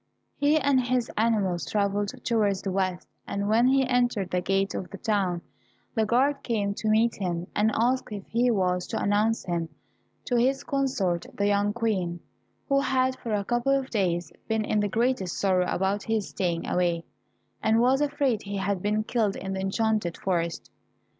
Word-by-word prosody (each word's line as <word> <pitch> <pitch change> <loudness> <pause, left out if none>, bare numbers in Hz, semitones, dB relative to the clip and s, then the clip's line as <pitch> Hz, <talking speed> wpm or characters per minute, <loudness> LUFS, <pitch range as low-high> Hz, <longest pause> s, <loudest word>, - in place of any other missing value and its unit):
He 290 +2 +3
and 280 -3 +3
his 250 -1 0
animals 205 -7 +1
travelled 200 +4 0
towards 210 -5 +1
the 195 - -2
west, 185 -1 -1 0.2
and 200 0 -2
when 225 +4 +4
he 265 0 +4
entered 245 -6 +1
the 180 - +1
gate 195 +2 0
of 180 - -5
the 195 - -8
town, 195 -6 0 0.5
the 220 -2 +1
guard 275 +5 +2
came 205 -4 -1
to 215 +2 -2
meet 225 +2 +3
him, 175 -3 -2
and 215 +1 +3
asked 245 +1 +1
if 200 -2 -6
he 240 +2 +1
was 180 -5 +1
to - - -2
announce 210 +3 +1
him 170 -2 -2 0.6
to 245 - +1
his 265 +3 +2
consort 235 -11 -1
the 200 - 0
young 205 0 +2
Queen, 195 -7 -1 0.5
who 275 -1 +3
had 260 -1 +1
for 225 -3 -2
a 200 -1 -2
couple 240 +4 +2
of 270 -1 -5
days 175 -6 0
been 220 -1 0
in 215 - +1
the 205 0 0
greatest 230 -4 0
sorrow 185 -2 +2
about 195 +2 0
his 220 -1 -1
staying 170 -3 -2
away, 175 -2 +1 0.6
and 220 +1 +3
was 260 +4 +3
afraid 280 -6 +1
he 200 0 -5
had 195 -1 -1
been 210 +2 0
killed 220 -3 0
in 190 0 -5
the 190 - -3
enchanted 210 -2 0
forest? 170 -3 -2
210 Hz, 180 wpm, -27 LUFS, 190-240 Hz, 0.6 s, when